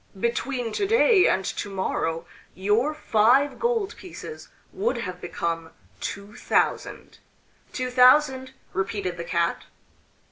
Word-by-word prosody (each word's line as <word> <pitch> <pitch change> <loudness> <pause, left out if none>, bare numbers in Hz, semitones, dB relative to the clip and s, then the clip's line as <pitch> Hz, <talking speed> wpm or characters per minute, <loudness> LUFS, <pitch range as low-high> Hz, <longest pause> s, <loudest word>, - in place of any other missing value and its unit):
"Between 235 +1 -1
to 400 - -1
day 450 -3 +5
and 190 - +1
to 205 - -4
morrow 165 -4 -2 0.3
your 215 +10 +1
five 260 +2 +3
gold 465 -4 0
pieces 420 +5 -10 0.2
would 415 +6 -1
have 180 -1 -5
become 165 -1 -3 0.3
two 200 +1 -6
thousand." - - -1 0.5
"Two 255 0 -3
thousand!" 260 +1 +4 0.2
repeated 190 -2 -2
the 170 - -4
Cat. 170 0 -1
235 Hz, 115 wpm, -25 LUFS, 190-300 Hz, 0.5 s, day